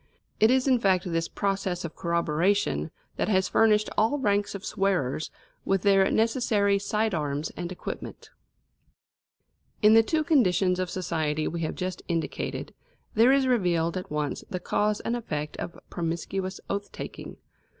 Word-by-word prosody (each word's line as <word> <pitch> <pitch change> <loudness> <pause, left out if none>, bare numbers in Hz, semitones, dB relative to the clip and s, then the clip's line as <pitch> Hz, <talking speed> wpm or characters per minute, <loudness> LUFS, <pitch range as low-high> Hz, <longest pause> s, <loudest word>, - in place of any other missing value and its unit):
It 220 - +6
is 260 +1 +3
in 255 -2 +4
fact 190 -4 +2
this 165 -2 -1
process 195 -3 -2
of 160 - -7
corroboration 170 - 0 0.3
that - - 0
has 190 -2 +2
furnished 215 -1 +4
all 225 +7 +2
ranks 205 -6 0
of 200 - -7
swearers 175 -8 0 0.3
with 195 -2 0
their 195 -1 +5
necessary 220 -3 +2
side 215 +1 0
arms 150 -2 -2
and 175 0 -6
equipment. 185 - -7 1.5
In 210 +1 +7
the 225 - +8
two 310 +7 0
conditions 190 - +3
of 185 -1 -1
society 155 -4 -1
we 170 0 -3
have 160 - -2
just 185 -1 -4
indicated, 165 -2 -3 0.4
there 230 +4 +5
is 275 -1 +4
revealed 175 -9 +1
at 185 - -5
once 150 -1 -2
the 185 -3 -3
cause 210 +3 0
and 235 - -1
effect 150 -10 -4
of 170 - -6
promiscuous 185 +3 -3
oath 200 0 -3
taking. - - -8
190 Hz, 150 wpm, -27 LUFS, 170-215 Hz, 1.5 s, the